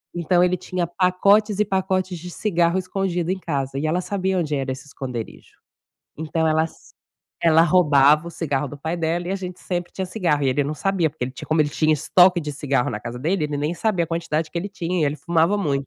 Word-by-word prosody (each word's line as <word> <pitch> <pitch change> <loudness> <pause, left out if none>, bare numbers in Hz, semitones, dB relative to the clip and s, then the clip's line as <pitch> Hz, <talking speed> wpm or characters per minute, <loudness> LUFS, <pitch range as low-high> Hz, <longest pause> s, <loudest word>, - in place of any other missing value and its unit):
então 175 +1 +2
ele 180 0 +2
tinha 180 -1 -3
pacotes 200 +4 +2
e 210 - +3
pacotes 190 -2 -1
de 180 +2 -8
cigarro 175 -3 +1
escondido 185 -2 -2
em 190 - 0
casa 135 -4 -3
e 145 - -2
ela 160 +3 +1
sabia 190 -1 -1
onde 150 -3 -1
era 135 -1 -2
esse 130 +2 -7
esconderijo. 125 -5 -7 0.6
Então 160 +1 -1
ela 155 0 +2
s 165 - -12 0.5
ela 165 -1 +5
roubava 150 -3 +4
o - - -5
cigarro 145 -4 -2
do 145 +1 -8
pai 160 +4 -3
dela 170 +1 -1
e - - -2
a 195 - 0
gente 180 -2 -7
sempre 175 -1 -4
tinha 190 - -3
cigarro, 175 -7 0
e 135 - +2
ele 140 +2 +1
não 150 +2 -3
sabia 185 0 0
porque 150 -2 -10
ele 125 - -5
tinha 130 - -10
como 155 0 +2
ele 145 - +3
tinha 155 +1 +1
estoque 180 +4 +4
de 150 - -4
cigarro 140 -3 -1
na 105 - -4
casa 115 +3 -7
dele 165 +2 0
ele 150 -1 -2
nem 150 +3 -1
sabia 195 -2 0
a - - -13
quantidade 165 -2 -2
que 170 - -3
ele 195 +4 -4
tinha 180 -3 -2
e - - +4
ele 145 - 0
fumava 170 +5 +1
muito. 140 -8 -1
165 Hz, 235 wpm, -22 LUFS, 150-185 Hz, 0.6 s, ela